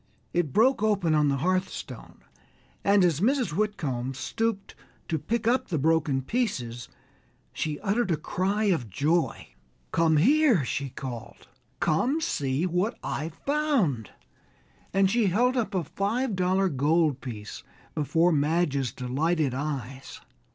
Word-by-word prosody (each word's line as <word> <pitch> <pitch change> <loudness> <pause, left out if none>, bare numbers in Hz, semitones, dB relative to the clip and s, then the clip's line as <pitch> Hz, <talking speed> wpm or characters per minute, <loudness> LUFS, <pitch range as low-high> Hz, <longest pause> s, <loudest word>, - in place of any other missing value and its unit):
It 170 -5 0
broke 235 - +3
open 200 -7 +2
on 150 -1 +3
the 140 -1 +1
hearthstone, 185 0 -3 0.6
and 200 -2 +4
as 165 -4 +1
Mrs. 250 - +1
Whitcomb 145 - -2
stooped 220 - -2 0.3
to 160 - -1
pick 225 +7 -2
up 250 +2 +2
the 165 - -1
broken 150 -3 +1
pieces 125 - -2 0.6
she 150 -2 -3
uttered 205 +1 0
a 165 - +1
cry 195 +7 -1
of 165 - +1
joy. 155 - 0 0.4
"Come 165 -2 +3
here!" 255 - +4
she 140 +1 -2
called, 125 -3 -8 0.3
"come, 245 - +1
see 145 - -1
what 185 +6 0
I've 155 +3 -4
found," 275 - +1 0.8
and 195 0 +3
she 220 +2 +2
held 245 +8 +2
up 230 -5 -1
a 180 - +1
five 210 - -1
dollar 185 +1 +2
gold 150 -1 +1
piece 110 -5 -7 0.3
before 165 +4 +2
Madge's 145 -3 +1
delighted 140 +3 0
eyes. 135 -2 -5
170 Hz, 130 wpm, -27 LUFS, 140-210 Hz, 0.8 s, and